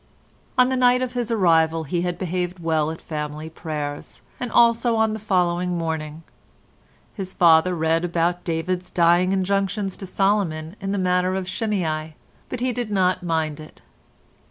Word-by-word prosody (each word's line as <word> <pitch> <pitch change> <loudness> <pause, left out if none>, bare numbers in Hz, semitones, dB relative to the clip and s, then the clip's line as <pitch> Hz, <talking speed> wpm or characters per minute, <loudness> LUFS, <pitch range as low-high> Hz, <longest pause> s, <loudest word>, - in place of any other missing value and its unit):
On 250 0 +5
the 260 - 0
night 250 0 +4
of 250 -1 -4
his 245 -2 -2
arrival 165 -6 +3
he 170 +3 -2
had 175 0 -2
behaved 180 0 -2
well 160 -3 0
at 160 - -6
family 150 0 -5
prayers, 150 -3 -6 0.2
as 250 - -3
also 235 0 +4
on 220 -1 +2
the 220 - -4
following 180 -3 0
morning; 160 -1 -4 0.9
his 190 -3 -7
father 170 +1 +5
read 165 +1 +1
about 175 0 0
David's 180 +2 -2
dying 175 +2 +3
injunctions 195 +1 0
to 195 - -8
Solomon 185 -4 0
in 195 0 -3
the 200 - -1
matter 180 0 +1
of 190 -1 -3
Shimei, 165 -8 -2 0.3
but 240 - -5
he 255 0 +1
did 240 -2 -3
not 185 -2 +1
mind 160 -3 -1
it. 155 - -13
180 Hz, 160 wpm, -23 LUFS, 160-200 Hz, 0.9 s, On